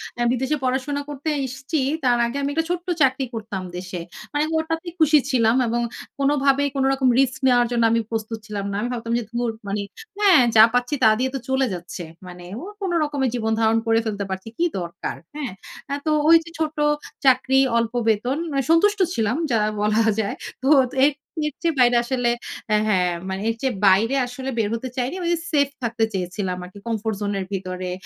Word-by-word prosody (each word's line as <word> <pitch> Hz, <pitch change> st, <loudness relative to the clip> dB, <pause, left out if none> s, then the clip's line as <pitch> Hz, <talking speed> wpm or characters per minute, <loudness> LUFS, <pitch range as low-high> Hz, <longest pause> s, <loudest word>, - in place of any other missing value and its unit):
অ্যা 240 Hz, -, -1 dB
বিদেশে 265 Hz, +4 st, 0 dB
পড়াশোনা 265 Hz, +3 st, -1 dB
করতে 290 Hz, +2 st, -4 dB, 0.2 s
এসছি, 265 Hz, +4 st, -4 dB, 0.3 s
তার 245 Hz, -2 st, +3 dB
আগে 235 Hz, +4 st, -3 dB
আমি 280 Hz, -, -1 dB
একটা 325 Hz, +2 st, 0 dB
ছোট্ট 355 Hz, +1 st, -3 dB
চাকরি 265 Hz, 0 st, +3 dB
করতাম 210 Hz, -4 st, -5 dB
দেশে। 180 Hz, 0 st, -5 dB, 0.3 s
মানে 290 Hz, -, 0 dB
আমি 320 Hz, -, -4 dB
ওটাতে 325 Hz, +2 st, -4 dB
খুশি 305 Hz, -1 st, +6 dB
ছিলাম 230 Hz, -3 st, +3 dB
এবং 235 Hz, +1 st, 0 dB, 0.4 s
কোনোভাবেই 280 Hz, 0 st, +2 dB
কোনো 270 Hz, -1 st, +1 dB
রকম 265 Hz, -1 st, +1 dB
রিস্ক 265 Hz, -1 st, +2 dB
নেওয়ার 245 Hz, -1 st, +4 dB
জন্য 235 Hz, -1 st, +1 dB
আমি 230 Hz, 0 st, +2 dB
প্রস্তুত 225 Hz, 0 st, -3 dB
ছিলাম 205 Hz, -2 st, -4 dB
না। -, -, -3 dB
আমি 240 Hz, -, -2 dB
ভাবতাম 230 Hz, -1 st, -3 dB
যে, -, -, -4 dB
"ধুর, 240 Hz, 0 st, -1 dB, 0.2 s
মানে 200 Hz, +1 st, -1 dB, 0.4 s
হ্যাঁ, 380 Hz, -9 st, +6 dB
যা 215 Hz, -, +10 dB
পাচ্ছি 245 Hz, +2 st, 0 dB
তা 220 Hz, -, +8 dB
দিয়ে 260 Hz, -, +1 dB
তো -, -, -2 dB
চলে 265 Hz, 0 st, +2 dB
যাচ্ছে। 175 Hz, 0 st, -7 dB, 0.2 s
মানে 180 Hz, 0 st, -10 dB, 0.2 s
ও -, -, -8 dB, 0.2 s
কোন 385 Hz, -2 st, -1 dB
রকমে 290 Hz, -3 st, -1 dB
জীবন 225 Hz, -2 st, -1 dB
ধারণ 225 Hz, 0 st, +3 dB
করে 225 Hz, 0 st, +4 dB
ফেলতে 205 Hz, -2 st, -2 dB
পারছি, 190 Hz, +2 st, -5 dB
কী 345 Hz, -, +2 dB
দরকার!" 170 Hz, -1 st, -5 dB, 0.2 s
হ্যাঁ? 285 Hz, -7 st, -4 dB, 0.4 s
এ -, -, 0 dB
তো 310 Hz, -, +1 dB, 0.2 s
ওইযে 330 Hz, 0 st, +5 dB
ছোট 310 Hz, -1 st, -1 dB, 0.5 s
চাকরি, 265 Hz, 0 st, +4 dB, 0.2 s
অল্প 230 Hz, 0 st, 0 dB, 0.2 s
বেতন, 245 Hz, +6 st, +1 dB
মানে 275 Hz, -1 st, 0 dB
সন্তুষ্ট 410 Hz, +5 st, +4 dB
ছিলাম 225 Hz, +3 st, 0 dB
যা 230 Hz, -, +3 dB, 0.2 s
বলা 210 Hz, +2 st, +2 dB, 0.2 s
যায়। 205 Hz, -2 st, -1 dB, 0.3 s
তো 265 Hz, -, +2 dB, 0.4 s
এর 295 Hz, -, +4 dB, 0.4 s
এর 300 Hz, -, -4 dB
চেয়ে 330 Hz, -4 st, 0 dB
বাইরে 245 Hz, -1 st, +5 dB
আসলে 245 Hz, -1 st, 0 dB, 0.4 s
অ্যা 215 Hz, -, +4 dB
হ্যাঁ, 185 Hz, -4 st, +2 dB, 0.2 s
মানে 190 Hz, +1 st, -3 dB
এর 225 Hz, -, -1 dB
চেয়ে 265 Hz, -2 st, 0 dB
বাইরে 215 Hz, +7 st, +4 dB
আসলে 260 Hz, +2 st, -6 dB
বের 215 Hz, -3 st, +1 dB
হতে 255 Hz, +3 st, -5 dB
চাইনি। 255 Hz, +6 st, -1 dB
ঐযে 345 Hz, 0 st, +1 dB
সেফ 285 Hz, -3 st, +3 dB
থাকতে 230 Hz, -1 st, 0 dB
চেয়েছিলাম 185 Hz, 0 st, -3 dB
আরকি 185 Hz, +3 st, -11 dB
comfort 220 Hz, -1 st, -2 dB
zone 205 Hz, 0 st, -1 dB
এর 190 Hz, -, -3 dB
ভিতরে। 185 Hz, -1 st, -4 dB
245 Hz, 195 wpm, -22 LUFS, 215-275 Hz, 0.5 s, যা